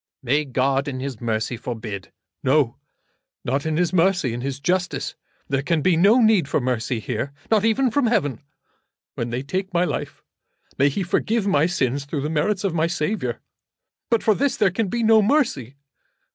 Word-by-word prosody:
"May 145 +4 +1
God, 135 +1 0
in 130 -2 -4
His 130 -4 -5
mercy, 110 +1 -1
forbid." 110 -5 -6 0.3
"No; 135 -2 +2 0.7
not 140 +5 -1
in 155 -1 0
His 175 +1 +1
mercy; 175 -8 +2
in 120 - -4
His 135 +1 -4
justice. 180 +4 -1 0.3
There 135 -1 0
can 155 +1 0
be 185 -2 +4
no 200 +9 +5
need 215 -9 +4
for - - +1
mercy 125 -2 -1
here, 125 +4 -3 0.2
not 215 -2 +4
even 240 +3 +2
from 275 0 +2
Heaven. 145 - 0 0.7
When 120 - -3
they 120 +3 -3
take 190 +6 -3
my 170 - +4
life - - -5 0.5
may 140 +1 +3
He 190 +8 -2
forgive 210 +4 0
my 160 -5 +3
sins 140 -6 -1
through 140 0 -3
the 150 +3 -2
merits 190 +6 0
of 195 -4 0
my 165 0 +1
Saviour. 175 +5 -2 0.7
But 230 -3 +2
for 220 - +4
this 280 +6 0
there 205 -4 +3
can 205 +3 -1
be 235 +5 -1
no 220 0 +6
mercy. 205 - +1
155 Hz, 185 wpm, -22 LUFS, 130-195 Hz, 0.7 s, no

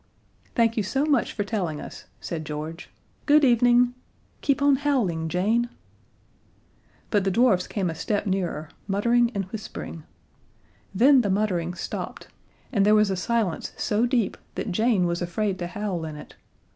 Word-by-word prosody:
"Thank 230 -1 +2
you - - +3
so 270 +8 0
much 285 -6 +2
for 205 - -2
telling 185 -8 -2
us," - - -9
said 165 -2 -5
George. 155 +3 -6 0.4
"Good 300 0 +6
evening. 245 0 +4 0.5
(Keep 280 -2 +1
on 285 -1 +5
howling, 220 - 0
Jane!)" 220 +8 +1 1.4
But 205 -3 +3
the 195 - +1
dwarfs 190 -3 +3
came 195 -3 -2
a 165 - -2
step 205 +6 -2
nearer, 180 -5 -2 0.2
muttering 235 +4 +2
and 195 -1 -1
whispering. 205 -6 -7 0.9
Then 255 +7 +5
the 205 - -1
muttering 185 -4 0
stopped - - -6 0.4
and 205 -7 +2
there 210 +1 +5
was 210 -2 +4
a - - 0
silence 210 -2 -1
so 220 +3 +1
deep 240 -5 0 0.2
that 210 - -3
Jane 215 -1 +2
was 170 0 -1
afraid 190 +3 -1
to 175 - -3
howl 195 -3 -3
in 155 -1 -6
it. 150 - -11
205 Hz, 160 wpm, -25 LUFS, 180-235 Hz, 1.4 s, Good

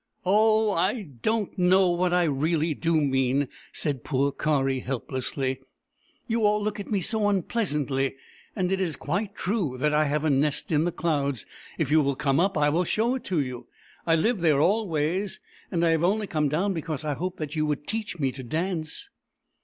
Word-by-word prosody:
" - - -40
Oh, 215 +2 +4
I 195 +5 0
don't 195 - -2
know 180 0 +4
what 175 +1 +1
I 180 0 +3
really 155 +2 +1
do 165 +1 +1
mean! 135 -1 +1
" - - -21
said 140 -5 -2
poor 140 0 +1
Kari 135 -2 0
helplessly. 130 +1 -3 0.3
" - - -39
You 230 -1 0
all 210 0 +4
look 210 0 -2
at 200 - -6
me 200 -3 0
so 210 +2 +1
unpleasantly. 150 - 0 0.4
And 185 -3 0
it 190 0 +1
is 170 -5 -1
quite 195 +7 -3
true 180 - -1
that 150 +3 +1
I 155 +1 +3
have 150 +1 0
a 155 - +3
nest 145 +3 0
in 155 +1 +3
the 175 - 0
clouds 140 -7 -1 0.2
— - - -18
if 150 -4 -1
you 155 0 +6
will 140 -1 0
come 140 0 +1
up, 195 0 +2
I 145 0 +3
will 165 +5 +2
show 225 +7 +1
it 260 - -4
to 175 -6 +1
you. 125 -3 -6 0.4
I 165 - +5
live 220 +7 +1
there 155 -5 +3
always, 180 0 0 0.3
and 170 -1 +1
I 165 - +4
have 165 0 +1
only 210 +4 +2
come 155 -6 0
down 185 +7 0
because 160 -3 -4
I 150 - 0
hoped 180 +5 -4
that 155 0 -5
you 155 -1 +1
would 150 -1 -2
teach 215 -4 -3
me 135 -4 0
to 130 - -9
dance 165 - -3
160 Hz, 210 wpm, -26 LUFS, 145-195 Hz, 0.4 s, you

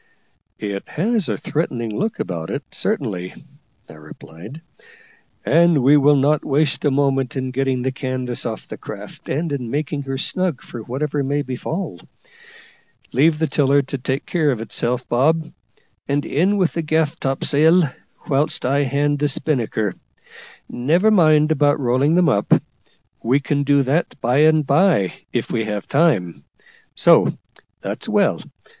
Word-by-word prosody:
"It 100 -2 -5
has 210 +3 0
a - - -1
threatening 120 -8 -3
look 220 +2 -2
about 85 -3 -4
it, - - -4
certainly," 90 0 -3 0.5
I - - -13
replied, 80 - -12 0.8
"and 170 -5 +4
we 140 +3 +6
will 145 0 +5
not 145 +2 +2
waste 145 +1 0
a - - +4
moment 135 -2 0
in 130 -1 -3
getting 130 -1 -1
the 130 - 0
canvas 130 -2 -3
off 110 -2 -6
the - - -9
craft, - - -10
and 155 +4 -2
in 125 -4 -4
making 145 +2 -2
her 135 -1 -4
snug 180 +1 -1
for 120 - -8
whatever 140 +5 -2
may 145 +2 -1
befall. 135 - -5 1.1
Leave 150 +5 +3
the 160 - +1
tiller 140 -1 +2
to 135 0 -5
take 130 +2 -3
care 160 -4 +1
of 125 -5 0
itself, 120 +3 -3
Bob, 155 +6 +1 0.5
and 145 +1 0
in 190 +8 +1
with 185 -4 +1
the 165 - -1
gaff 155 -1 0
topsail, 155 +6 +3 0.4
whilst 140 -1 0
I 135 +3 +2
hand 145 +2 0
the 145 - +2
spinnaker. 120 - -1 0.7
Never 165 - +2
mind 155 -5 +4
about 145 -1 +2
rolling 135 +5 +2
them 180 -1 +4
up; 100 -8 0 0.7
we 130 +5 +2
can 145 0 -1
do 140 0 +3
that 140 +4 -1
by 125 +2 +1
and 155 0 +4
bye, 140 - +3 0.2
if - - -2
we 115 -1 -1
have 105 -2 -4
time. 135 - +1 0.5
So; - - +4 0.4
that's - - -5
well. - - +2
140 Hz, 150 wpm, -20 LUFS, 125-155 Hz, 1.1 s, we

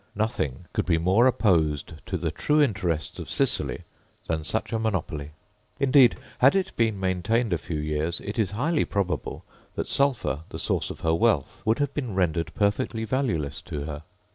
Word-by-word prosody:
Nothing 90 - -2
could - - -1
be 85 -2 +3
more 95 +9 +4
opposed 80 - +2
to - - -1
the - - -2
true 150 +1 +1
interests 95 - 0
of - - -7
Sicily - - 0 0.4
than 80 -1 -1
such 110 +8 -2
a 110 - +1
monopoly; 90 -9 -2 0.5
indeed, 135 -2 +6 0.2
had 135 +8 +6
it 190 -1 0
been 110 -4 +1
maintained 95 +4 +1
a 85 - 0
few 75 +2 -4
years, 75 +2 -1
it 105 +3 -5
is 105 -4 +2
highly 145 - +1
probable 95 -3 -2 0.3
that - - -2
sulphur, 135 - +1
the - - -6
source - - -1
of - - -8
her 80 - +2
wealth, 85 -5 +1
would 110 +1 +3
have 145 -1 -1
been 125 -9 -3
rendered 85 -3 0
perfectly 105 +2 0
valueless 95 - -1
to 75 - -5
her. 75 -1 -5
100 Hz, 175 wpm, -26 LUFS, 80-120 Hz, 0.5 s, indeed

